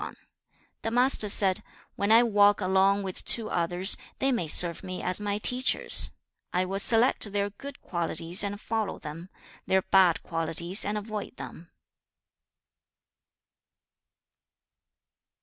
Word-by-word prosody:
XXI. - - -8 0.7
The 225 - -4
Master 245 -2 +2
said, 195 0 +2 0.3
'When 200 +2 -2
I 230 +2 +6
walk 205 -3 +2
along 195 +1 +1
with 190 -1 -6
two 225 -2 +2
others, 175 +3 +1 0.2
they 270 - -1
may 205 -10 -3
serve 170 +2 +5
me 185 0 -8
as 185 - -1
my 205 0 -3
teachers. 250 +5 +3 0.4
I 180 +1 -1
will 195 +1 -4
select 225 0 +4
their 205 0 -2
good 275 +7 -12
qualities 170 +1 -3
and 200 0 -5
follow 220 -1 -4
them, 165 +4 -10 0.4
their 190 0 +1
bad 185 -3 +2
qualities 165 +3 -2
and 210 +1 -3
avoid 210 0 -7
them.' 170 - -12
200 Hz, 130 wpm, -26 LUFS, 180-215 Hz, 0.7 s, I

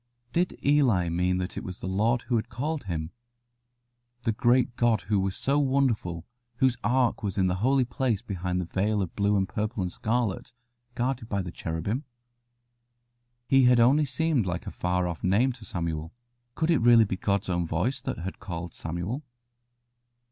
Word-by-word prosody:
Did 180 +1 0
Eli 125 - +3
mean 90 +2 +1
that 90 0 -3
it - - -9
was 90 0 -7
the - - -7
Lord 110 +6 +1
who 125 - -1
had 110 - -3
called 145 +5 -3
him? 80 -3 -3 1.1
The 115 - +2
great 120 +1 +2
God 120 -3 +2
who 105 -1 0
was 95 0 -1
so 140 +2 +2
wonderful, 125 - 0 0.3
whose 130 0 +2
Ark 125 +3 +2
was 100 -3 -3
in 95 - +3
the 90 0 +1
Holy 130 +5 +3
Place 120 -3 -1
behind 90 -4 -2
the 90 - -2
veil 100 +4 0
of 90 - -7
blue 100 0 +2
and 95 -1 +1
purple 105 0 -2
and 90 -1 -3
scarlet, 115 0 -1 0.4
guarded 125 -2 -2
by 100 -2 -1
cherubim? 90 - -3 1.4
He 135 -1 +5
had 125 -1 +5
only 135 +6 +5
seemed 140 -4 0
like 90 0 -3
a - - -5
far 90 0 0
off 85 -2 -5
name 105 +8 +3
to 120 -3 -11
Samuel. 85 -3 -3 0.4
Could 160 +1 +1
it 160 - +4
really 115 -1 +7
be 95 - -2
God's 100 +1 -1
own 85 -2 0
voice 110 +13 -1
that - - -4
had 90 +3 -6
called 85 -3 -6
Samuel? 85 - -4
105 Hz, 175 wpm, -27 LUFS, 90-125 Hz, 1.4 s, really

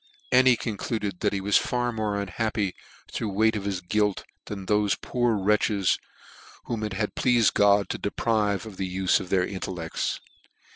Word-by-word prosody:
and 130 +1 +6
he 125 -2 +6
concluded 105 -3 -3
that 105 - +1
he 100 - -1
was 100 +1 +3
far 120 -1 0
more 105 -3 -2
unhappy 100 0 -1 0.4
through 110 - -2
ti>e 95 - -6
weight 110 +1 +4
of" 100 -2 -4
his 95 -3 -2
guilt, 105 +2 0 0.2
than 100 -2 -6
thofe 105 0 +1
poor 120 -2 0
wretches 100 -1 +2 0.6
whom 115 -3 -3
it 105 -2 -3
had 105 +1 -2
pleafed 120 -3 +3
God 100 0 +4
to - - -3
deprive 105 -1 0
of 105 -4 -10
the 95 -1 -3
ufe 95 -2 +3
of 90 - -7
their 90 -1 +2
intellects. 90 -4 -3
105 Hz, 180 wpm, -26 LUFS, 95-110 Hz, 0.6 s, and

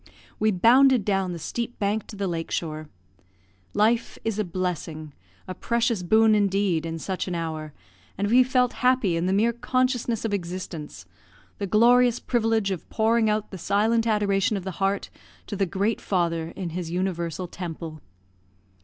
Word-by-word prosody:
We 215 - +3
bounded 240 +4 +5
down 195 -3 0
the 175 - -5
steep 235 +8 -4
bank 210 +1 -1
to 215 - -9
the 200 0 -2
lake 165 -2 -3
shore. 155 -2 -4 0.9
Life 225 +3 +2
is 220 -2 -1
a - - +2
blessing, 170 -4 -4 0.3
a 185 - -4
precious 235 +1 0
boon 220 +5 +4
indeed, 195 -5 +1
in 165 0 -4
such 185 +4 -4
an 180 - -3
hour, 160 -2 -4 0.5
and 200 +2 0
we 245 +4 +6
felt 250 -1 +2
happy 250 -8 +3
in 170 +2 0
the - - +1
mere 220 +4 +2
consciousness 245 -2 0
of 215 - -1
existence 175 -4 -5 0.5
the 200 - -2
glorious 240 +4 +4
privilege 225 -4 0
of 185 - -5
pouring 225 0 +2
out 215 0 -1
the 190 - -7
silent 225 +5 +1
adoration 210 0 +1
of 190 - -6
the 190 0 -7
heart 195 +1 0 0.3
to - - -5
the 195 -1 0
Great 200 +5 -1
Father 170 -3 -1
in 180 -3 -4
his 175 0 -4
universal 175 -1 -2
temple. 165 -3 -7
200 Hz, 165 wpm, -25 LUFS, 175-225 Hz, 0.9 s, we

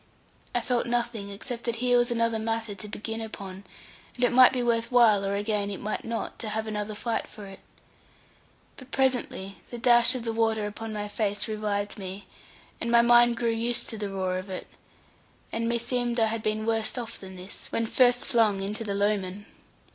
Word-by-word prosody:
I 245 - +2
felt 245 0 0
nothing 235 -4 -1
except 235 +4 -6
that 235 -1 0
here 245 +1 +3
was 240 +1 +2
another 230 -1 +1
matter 225 -1 -2
to 200 +2 -8
begin 225 +2 -4
upon; 195 -3 -7 0.5
and 250 - -3
it 245 - +4
might 255 0 +8
be 250 -2 -1
worth 230 0 +1
while, 225 -5 +5
or 200 0 -1
again 205 0 0
it 200 - -5
might 210 - -3
not, 230 0 -4
to 220 - -3
have 220 +1 -2
another 210 -1 -3
fight 230 +2 -2
for 210 - -10
it. 195 -1 -11 1.2
But 260 0 -12
presently 250 -8 0
the 240 - -6
dash 240 +1 +5
of 250 - -3
the 230 -1 -2
water 225 -1 +1
upon 220 +2 -5
my 210 -1 -3
face 205 0 -2
revived 210 -1 -2
me, 190 +1 -7 0.6
and 235 - -1
my 235 0 +6
mind 240 0 +6
grew 230 -1 +1
used 230 +1 0
to 225 - -5
the 205 -1 -3
roar 185 -1 -1
of 185 +2 -9
it, 185 - -5 0.9
and 230 0 -1
meseemed 240 0 0
I 225 - +5
had 225 0 -3
been 215 0 -1
worse 225 +1 0
off 230 -2 -5
than 190 -1 -10
this, 185 +2 -8
when 230 - 0
first 245 +1 +3
flung 220 -6 +3
into 210 +4 -3
the 200 -2 -2
Lowman. 200 -1 -1
225 Hz, 200 wpm, -27 LUFS, 205-235 Hz, 1.2 s, might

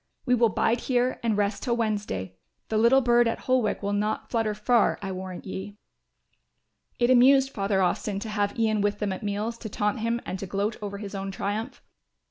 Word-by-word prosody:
We 250 - +2
will 235 -2 +4
bide 230 +3 +1
here 250 0 0
and 225 -3 0
rest 205 0 0
till 240 -3 0
Wednesday; 205 - -2 0.4
the 220 - 0
little 240 +4 +5
bird 240 -1 +4
at 230 - -2
Holwick 255 -5 0
will 200 +1 -1
not 210 +1 -2
flutter 225 -3 0
far, 230 +2 +2
I 195 -1 -5
warrant 185 -1 -6
ye." 200 +1 -6 1.2
It 240 +1 +3
amused 270 +2 +6
Father 195 -3 0
Austin 195 +3 -1
to 220 - -5
have 205 0 -1
Ian 220 -2 +1
with 205 0 0
them 205 -2 -1
at 185 - -7
meals 210 +3 -3
to 220 - -6
taunt 210 +3 -1
him 230 +1 0
and 185 - -4
to 195 - -5
gloat 200 +3 -1
over 200 -1 -5
his 200 0 -7
own 195 0 -4
triumph. 205 +6 -4
215 Hz, 200 wpm, -26 LUFS, 200-235 Hz, 1.2 s, amused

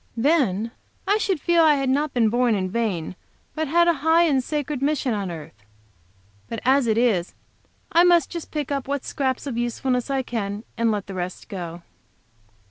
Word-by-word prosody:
Then, 230 - +2 0.4
I 410 +2 +3
should 385 -6 0
feel 340 +3 +3
that 315 -2 +6
I - - +2
had 275 -1 -1
not 285 +3 +1
been 230 -3 +2
born 240 0 +2
in 185 -2 -2
vain, 190 -7 -2 0.4
but 315 0 -2
had 340 +4 +4
a 340 - +5
high 325 +2 +4
and 275 -6 +2
sacred 295 -1 -3
mission 275 -3 0
on 200 -3 -2
earth. 150 - -9 0.9
But 230 - -4
as 265 -1 +4
it 220 -1 +2
is, 215 -8 +1 0.6
I 340 - +5
must 345 -4 +4
just 340 -2 -6
pick 295 -3 -4
up 275 -2 -2
what 280 -1 -2
scraps 260 -1 -2
of 245 -4 -3
usefulness 250 +2 -1
I 270 -1 0
can, 210 -4 -4
and 230 0 +1
let 210 -3 -1
the 195 - -8
rest 180 0 -5
go. 175 -3 -6
255 Hz, 195 wpm, -23 LUFS, 210-300 Hz, 0.9 s, that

